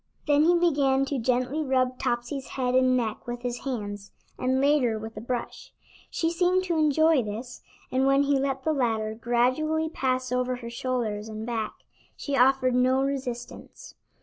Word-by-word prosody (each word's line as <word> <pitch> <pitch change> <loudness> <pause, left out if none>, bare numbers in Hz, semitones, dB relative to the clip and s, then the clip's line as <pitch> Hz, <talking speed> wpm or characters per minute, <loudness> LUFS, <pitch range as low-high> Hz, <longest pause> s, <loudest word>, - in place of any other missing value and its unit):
Then 295 +1 +4
he 350 +1 +5
began 280 -6 +2
to 275 -1 -2
gently 255 +5 0
rub 255 -3 0
Topsy's 245 +3 -2
head 250 -1 0
and 255 0 +4
neck 225 -2 -3
with 240 0 -5
his 245 -1 -3
hands, 205 -6 -5 0.2
and 260 +1 0
later 275 -5 +2
with 220 +1 -8
a 215 - -6
brush. 240 +1 -5 0.4
She 330 0 -1
seemed 360 +2 +2
to 350 -2 -1
enjoy 310 -1 +4
this, 230 +3 -7 0.3
and 260 +1 +2
when 275 +1 +4
he 280 -1 +2
let 270 -1 -2
the 315 - +1
latter 225 -5 0
gradually 255 +8 0
pass 255 -4 -1
over 250 0 0
her 235 -1 -8
shoulders 235 -4 -3
and 215 0 -6
back, 230 -2 -3 0.4
she 285 - -3
offered 260 -1 +3
no 255 +2 +3
resistance. 260 -3 -5
255 Hz, 170 wpm, -26 LUFS, 240-280 Hz, 0.4 s, he